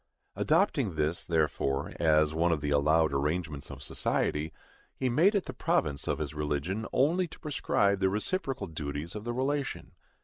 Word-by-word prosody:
Adopting - - +2
this, 75 +2 0
therefore, 75 -3 0
as 75 -1 +3
one 85 +2 +2
of 80 - +1
the 75 0 -2
allowed 75 +2 +3
arrangements 75 0 -2
of - - -8
society, 75 +2 -1 0.4
he 130 - 0
made 170 - +4
it 200 - +1
the - - -6
province 70 -2 0
of - - 0
his 75 -2 -4
religion 75 +8 -2
only 170 +7 +2
to - - -13
prescribe 100 -9 +1
the 95 -1 +3
reciprocal 130 - -2
duties 75 -1 -5
of 105 +1 -7
the 120 - -1
relation. 135 +2 -2
80 Hz, 165 wpm, -30 LUFS, 75-120 Hz, 0.4 s, made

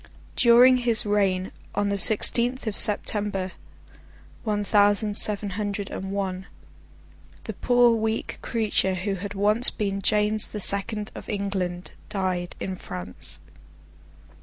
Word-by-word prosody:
During 245 +2 +6
his 235 -3 +2
reign, 195 -3 0 0.2
on 205 0 0
the 200 - -1
sixteenth 240 +6 +2
of 215 -2 -3
September, 205 -3 -1 0.9
one 210 -2 -1
thousand 205 0 +2
seven 205 -1 +3
hundred 205 0 -4
and 190 - -6
one, 190 -1 -4 1.0
the - - -6
poor 245 -1 +3
weak 220 0 -2
creature 215 -4 0
who 190 +2 -3
had 200 +2 -6
once 210 +4 +3
been 200 -2 -3
James 210 +1 +3
the 210 - -7
Second 210 +2 0
of - - -10
England, 190 -3 -3 0.2
died 185 -3 -3
in 190 -1 -5
France. 90 - -8
205 Hz, 125 wpm, -24 LUFS, 195-215 Hz, 1.0 s, During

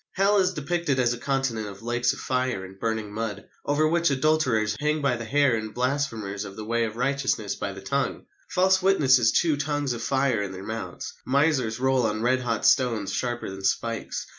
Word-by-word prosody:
Hell 200 +1 +3
is 185 -1 +1
depicted 150 -1 -1
as 120 -2 +2
a - - -5
continent 135 -5 -1
of 100 +1 -10
lakes 120 +1 +1
of - - -6
fire 125 -6 -1
and 95 +1 -13
burning 110 -2 -2
mud, 105 -2 -4 0.2
over 150 +2 +3
which 170 +1 +2
adulterers 130 -7 +2
hang 150 +1 +1
by 140 -4 +1
the 115 -1 -6
hair 140 0 +3
and 110 -1 -5
blasphemers 120 -6 -1
of 100 -1 -9
the 110 - -7
way 115 +1 +1
of 110 -1 -5
righteousness 130 -5 -1
by 100 - -4
the 95 0 -9
tongue. 140 +6 -2 0.2
False 190 +1 +3
witnesses 130 -11 +4
chew 160 -3 +2
tongues 145 -2 -1
of 120 - -6
fire 130 -3 +1
in 100 -2 -4
their 95 0 -8
mouths. 110 -5 -6
Misers 135 -5 +2
roll 130 0 +2
on 110 +1 -2
red 130 +2 +3
hot 115 -3 -2
stones 115 -7 +2
sharper 120 -5 -2
than 95 0 -8
spikes. 115 +4 -1
125 Hz, 200 wpm, -25 LUFS, 110-140 Hz, 0.2 s, witnesses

